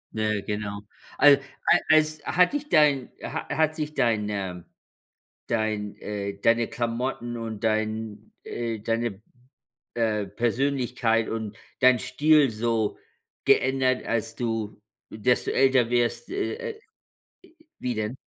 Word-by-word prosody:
Ja, 105 Hz, -1 st, 0 dB
genau. 105 Hz, 0 st, -4 dB, 0.4 s
Al 145 Hz, -1 st, +7 dB, 0.3 s
al -, -, +5 dB
als 155 Hz, -1 st, +4 dB
hat 180 Hz, +7 st, +3 dB
dich 295 Hz, 0 st, -3 dB
dein 145 Hz, -5 st, +4 dB
ha -, -, -5 dB
hat 155 Hz, 0 st, +1 dB
sich 150 Hz, -1 st, -4 dB
deine 105 Hz, -6 st, -1 dB, 0.8 s
dein, 110 Hz, -2 st, -2 dB
äh 100 Hz, -1 st, -5 dB
deine 115 Hz, 0 st, +3 dB
Klamotten 120 Hz, 0 st, -3 dB
und 110 Hz, -1 st, -6 dB
dein, 110 Hz, -1 st, -2 dB
äh 115 Hz, -2 st, -4 dB
deine, 115 Hz, -1 st, -2 dB, 0.7 s
äh, 110 Hz, -3 st, 0 dB
Persönlichkeit 120 Hz, +1 st, 0 dB
und 110 Hz, -2 st, -4 dB, 0.2 s
dein 130 Hz, -1 st, +5 dB
Stil 150 Hz, +1 st, +3 dB
so 110 Hz, -1 st, -1 dB, 0.5 s
geändert, 130 Hz, -1 st, +2 dB
als 115 Hz, -1 st, -2 dB
du 115 Hz, -3 st, -3 dB, 0.3 s
desto 125 Hz, +4 st, +1 dB
älter 130 Hz, -3 st, +3 dB
wirst, 120 Hz, -, 0 dB
äh, 435 Hz, +5 st, -3 dB
äh 435 Hz, -, -15 dB, 1.0 s
wie 125 Hz, -1 st, -2 dB
denn? 110 Hz, +2 st, -3 dB
115 Hz, 120 wpm, -26 LUFS, 110-130 Hz, 1.0 s, Al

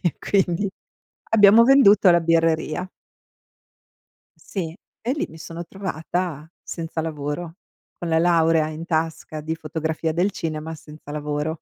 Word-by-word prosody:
e 175 Hz, -, 0 dB
quindi 195 Hz, 0 st, +1 dB, 0.6 s
abbiamo 215 Hz, +1 st, +7 dB
venduto 235 Hz, -7 st, +6 dB
la 170 Hz, -1 st, +4 dB
birreria. 165 Hz, +1 st, +1 dB, 1.5 s
Sì, 170 Hz, -4 st, -5 dB, 0.2 s
e 245 Hz, +3 st, -1 dB
lì 295 Hz, -, -2 dB
mi 160 Hz, -, -12 dB
sono 165 Hz, +1 st, -7 dB
trovata 175 Hz, -4 st, -4 dB, 0.2 s
senza 165 Hz, -1 st, -5 dB
lavoro, 160 Hz, +1 st, -4 dB, 0.4 s
con 175 Hz, -, -5 dB
la 160 Hz, -, +3 dB
laurea 165 Hz, -2 st, +3 dB
in 155 Hz, +1 st, -6 dB
tasca 160 Hz, -2 st, -2 dB
di 160 Hz, +2 st, -3 dB
fotografia 160 Hz, 0 st, -3 dB
del 180 Hz, +5 st, +1 dB
cinema 160 Hz, -3 st, -4 dB
senza 150 Hz, -1 st, -13 dB
lavoro. 150 Hz, +1 st, -2 dB
165 Hz, 130 wpm, -23 LUFS, 155-180 Hz, 1.5 s, abbiamo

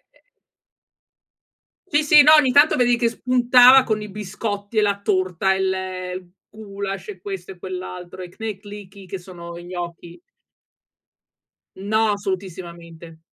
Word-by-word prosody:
Eh. -, -, -30 dB, 1.6 s
Sì, 295 Hz, -3 st, +2 dB
sì, 295 Hz, 0 st, +7 dB
no, 305 Hz, -, +7 dB
ogni 295 Hz, -5 st, +5 dB
tanto 290 Hz, +4 st, +5 dB
vedevi 245 Hz, -1 st, +2 dB
che 235 Hz, -1 st, +1 dB
spuntava 250 Hz, +2 st, +5 dB
con 215 Hz, -3 st, -2 dB
i 210 Hz, -, -8 dB
biscotti 205 Hz, +1 st, -6 dB
e -, -, +3 dB
la 200 Hz, -1 st, 0 dB
torta, 185 Hz, -1 st, 0 dB
il 185 Hz, -1 st, -4 dB, 0.2 s
gulasch, 200 Hz, -2 st, -7 dB
e 195 Hz, -, -8 dB
questo 190 Hz, -2 st, -7 dB
e 185 Hz, -, -12 dB
quell'altro 185 Hz, 0 st, -8 dB
e 180 Hz, -, -8 dB
knedlíky 205 Hz, -1 st, -9 dB
che 190 Hz, +1 st, -6 dB
sono 170 Hz, -1 st, -10 dB
i 175 Hz, -, -10 dB
gnocchi. 175 Hz, -1 st, -8 dB, 1.6 s
No, 215 Hz, +3 st, 0 dB
assolutissimamente. 170 Hz, -4 st, -7 dB
195 Hz, 130 wpm, -21 LUFS, 180-220 Hz, 1.6 s, sì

